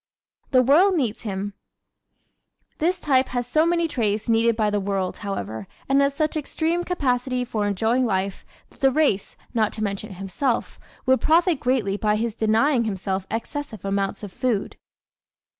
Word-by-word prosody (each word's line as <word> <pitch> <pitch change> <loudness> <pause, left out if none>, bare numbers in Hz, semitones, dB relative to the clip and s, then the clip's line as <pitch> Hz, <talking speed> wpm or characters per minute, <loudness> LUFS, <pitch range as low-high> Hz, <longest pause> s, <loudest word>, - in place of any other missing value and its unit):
The 255 -2 +5
World 350 +10 +5
Needs 245 -9 -1
Him 205 -2 -4 1.2
¶ - - -45
This 355 +4 +1
type 265 -5 +2
has 245 -1 -2
so 310 +7 +2
many 340 -1 +2
traits 215 -7 -1
needed 230 0 +3
by 215 -2 +1
the 205 - +1
world, 195 -2 -2
however, 110 - -5 0.2
and 275 +1 +4
has 280 0 +1
such 310 +1 0
extreme 320 +3 -1
capacity 255 -7 0
for 215 -3 -1
enjoying 225 +6 +1
life 195 -1 -1 0.3
that - - -22
the 270 - +5
race, 265 -8 +1 0.2
not 220 -3 +2
to 215 - -4
mention 200 0 -4
himself, 195 +7 -2 0.3
would 260 0 +3
profit 335 -1 +3
greatly 235 -6 0
by 210 0 +1
his 225 +1 -1
denying 230 +4 +2
himself 190 -2 -2
excessive 225 - -5
amounts 195 +1 -1
of 200 -3 -7
food. 240 -6 -1
230 Hz, 160 wpm, -24 LUFS, 205-280 Hz, 1.2 s, The